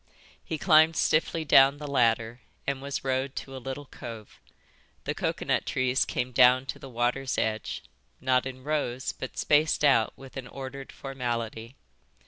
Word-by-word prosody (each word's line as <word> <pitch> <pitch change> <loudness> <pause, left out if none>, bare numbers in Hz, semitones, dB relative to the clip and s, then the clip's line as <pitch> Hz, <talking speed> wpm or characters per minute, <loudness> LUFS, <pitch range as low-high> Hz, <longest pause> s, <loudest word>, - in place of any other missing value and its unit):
He 155 - -4
climbed 160 -1 +5
stiffly 160 +1 +1
down 140 0 +6
the 150 - -7
ladder 115 -3 +1 0.3
and 140 -1 -2
was 140 0 -4
rowed 130 0 -1
to 135 - -6
a 130 - -7
little 135 +3 -6
cove. 115 -5 -10 0.6
The - - -2
coconut - - -1
trees 130 0 +1
came 125 +1 -2
down 125 +1 +5
to - - -16
the 135 - -10
water's 125 +2 -1
edge, 110 -1 -2 0.4
not 130 0 +2
in 130 -1 -8
rows, 140 -4 -1
but 130 - -8
spaced 150 0 +3
out 130 -6 +4
with 135 0 -11
an 130 -2 -6
ordered 135 +1 -8
formality. 120 -3 -4
130 Hz, 155 wpm, -28 LUFS, 125-140 Hz, 0.6 s, down